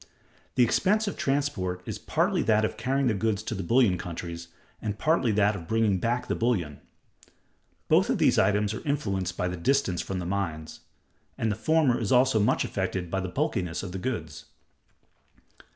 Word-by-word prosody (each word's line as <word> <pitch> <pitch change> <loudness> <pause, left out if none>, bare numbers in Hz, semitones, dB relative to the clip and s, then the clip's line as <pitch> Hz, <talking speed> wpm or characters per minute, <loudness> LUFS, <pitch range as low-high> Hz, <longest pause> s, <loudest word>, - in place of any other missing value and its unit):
The 125 - +5
expense 210 - +2
of 200 - -2
transport 120 -11 -1
is - - -5
partly - - 0
that 110 -1 +3
of - - -3
carrying 135 +5 0
the 120 - +2
goods 105 0 -1
to 110 - -4
the 95 - -3
bullion 100 -1 +3
countries, 85 -1 -6 0.3
and 105 -1 -3
partly 155 -7 +2
that 105 0 +3
of 85 -4 -8
bringing 110 -4 +2
back 120 +5 -1
the - - -2
bullion; 95 -12 -1 1.1
both - - +4
these - - +3
items 105 0 +2
are - - -6
influenced 100 -11 -2
by 90 - 0
the 90 0 -4
distance 95 -1 +1
from 95 - -4
the 90 - -4
mines; 85 -5 -3 0.6
and 110 - 0
the - - -1
former 150 +1 +2
is 110 -4 -2
also 125 -2 +4
much 105 - +2
affected 90 -3 -3
by 95 - 0
the 95 -1 -3
bulkiness 90 - -2
of 95 - -6
the 95 - -5
goods. 85 - -4
105 Hz, 180 wpm, -27 LUFS, 90-125 Hz, 1.1 s, The